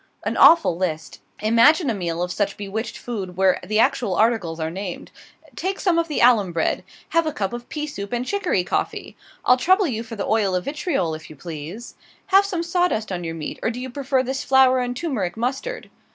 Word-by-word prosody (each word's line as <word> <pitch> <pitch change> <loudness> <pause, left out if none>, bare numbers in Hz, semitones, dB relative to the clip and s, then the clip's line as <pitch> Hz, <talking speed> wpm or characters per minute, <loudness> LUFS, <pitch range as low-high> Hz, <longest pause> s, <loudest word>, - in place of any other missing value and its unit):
An - - -1
awful 330 - +6
list! 165 -3 -3 0.2
Imagine 235 - +5
a - - -1
meal 175 -3 -2
of 180 - -3
such 200 +1 -1
bewitched 215 +3 -4
food, 195 -7 -6
where 190 -1 +3
the 215 +4 -1
actual 235 -5 +2
articles 210 -7 +1
are 160 0 -2
named. 185 0 -6 0.4
"Take 380 +2 -3
some 350 -4 +2
of 335 - 0
the 300 - -1
alum 225 -7 +5
bread." 165 -1 0 0.3
"Have 335 -1 +2
a - - 0
cup 200 -5 -3
of 240 0 -7
pea 300 -1 -3
soup 200 -9 -7
and 245 0 -2
chicory 370 - 0
coffee?" - - -3 0.3
"I'll 250 - +6
trouble 375 +9 +3
you 230 -8 -2
for 230 0 -8
the 205 - -3
oil 210 -4 +1
of 180 - -2
vitriol, 280 - -1
if 155 0 -8
you 155 - -11
please." 165 - -8 0.4
"Have 395 +1 +7
some 360 -4 -2
sawdust 345 - 0
on 175 -1 -3
your 165 -1 -4
meat, 155 -2 -6
or - - 0
do 245 +1 -5
you 260 0 -6
prefer 265 -1 0
this 265 +1 -3
flour 265 -1 +5
and 245 0 -2
turmeric 225 - -2
mustard?" 270 - -3
230 Hz, 210 wpm, -22 LUFS, 185-280 Hz, 0.4 s, Have